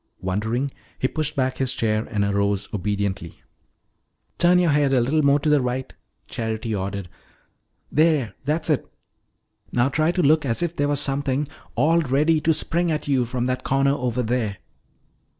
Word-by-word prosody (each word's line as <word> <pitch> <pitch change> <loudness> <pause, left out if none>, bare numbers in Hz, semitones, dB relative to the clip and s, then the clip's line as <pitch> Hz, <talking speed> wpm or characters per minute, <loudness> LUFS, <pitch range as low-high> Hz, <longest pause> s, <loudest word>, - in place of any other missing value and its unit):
Wondering, 110 +9 -1 0.3
he 130 - +1
pushed 155 +3 -2
back 130 -2 -1
his 130 -1 0
chair 110 -2 0
and 105 -2 0
arose 100 0 0
obediently. 100 -3 -3 1.0
"Turn 175 +1 +5
your 175 -3 +3
head 145 -2 +2
a - - +4
little 140 +6 +2
more 140 0 +4
to 155 - -1
the 150 -2 +4
right," 125 +1 -3 0.3
Charity 110 0 -3
ordered. 100 -1 -3 0.8
"There, 150 -6 +2
that's 155 +4 0
it! 145 - -1 0.8
Now 125 +2 +2
try 155 +4 +1
to 180 0 0
look 155 +2 +4
as 125 +4 0
if 170 0 -2
there 145 - +1
were 145 - +1
something 140 0 0 0.3
all 155 +7 +3
ready 150 +2 +2
to 160 - +3
spring 170 +2 0
at 150 -1 -2
you 130 -4 +1
from 125 0 -2
that 130 0 -2
corner 135 +1 +2
over 125 -2 -1
there." 110 -4 -1
130 Hz, 170 wpm, -23 LUFS, 110-150 Hz, 1.0 s, Turn